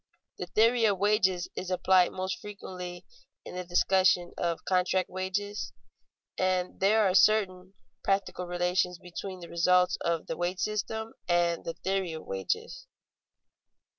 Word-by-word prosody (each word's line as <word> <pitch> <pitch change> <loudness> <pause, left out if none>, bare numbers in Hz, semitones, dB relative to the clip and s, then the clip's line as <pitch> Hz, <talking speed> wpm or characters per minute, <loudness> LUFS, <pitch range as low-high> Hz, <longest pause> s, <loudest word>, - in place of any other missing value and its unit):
The 180 - -4
theory 230 +5 +3
of 200 -3 +3
wages 190 -3 +2
is 185 - -5
applied 185 0 +3
most 185 0 -3
frequently 180 -3 -8 0.4
in - - -8
the 180 0 -4
discussion 180 0 +2
of 170 -1 -2
contract 185 0 +1
wages, 190 +3 -3 0.7
and 185 -1 0
there 210 +3 +4
are 185 - +1
certain 190 -2 +3 0.3
practical 195 -2 -1
relations 180 0 0
between 180 +2 -8
the 170 - -8
results 180 +2 +3
of 170 -1 -1
the - - -4
wage 180 +2 -2
system 220 +2 -2 0.2
and 175 -1 +2
the 165 - -4
theory 190 -1 -2
of 160 - -8
wages. 95 -1 -4
185 Hz, 135 wpm, -29 LUFS, 175-195 Hz, 0.7 s, there